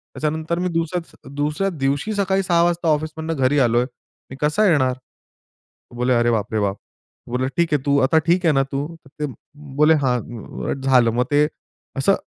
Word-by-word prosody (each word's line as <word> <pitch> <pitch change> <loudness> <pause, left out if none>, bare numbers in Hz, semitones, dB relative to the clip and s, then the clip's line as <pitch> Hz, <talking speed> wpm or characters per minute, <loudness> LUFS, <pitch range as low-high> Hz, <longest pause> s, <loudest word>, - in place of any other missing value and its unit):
त्याच्यानंतर 160 +2 -2
मी 180 - 0
दुसऱ्या, 165 -3 -4
दुसऱ्या 150 +7 0
दिवशी 145 +4 -1
सकाळी 195 -1 +1
6 175 -2 +2
वाजता 175 0 0
ऑफिसमधनं 155 +1 -1
घरी 140 +3 +3
आलोय. 120 -1 +3 0.4
मी 135 - -8
कसा 150 +9 +2
येणार?" 130 -6 +3 1.0
बोले, 125 +1 +1
"अरे 120 0 +3
बाप 110 -2 -1
रे! 110 - +1
बाप." 100 -1 0 0.5
बोलले, 125 +1 0
"ठीक 170 -2 +1
आहे, 145 - 0
तू 140 0 +3
आता 160 +5 +4
ठीक 180 +2 +2
आहे 160 - +5
ना 135 - +3
तू?" 140 +1 -1 0.9
बोले, 150 +2 +5
"हां" 125 -3 -3
झालं. 130 -3 +4
मग, 125 +1 +2
ते 145 +1 +4 0.5
असं 140 +9 +3
150 Hz, 165 wpm, -21 LUFS, 130-165 Hz, 1.0 s, आहे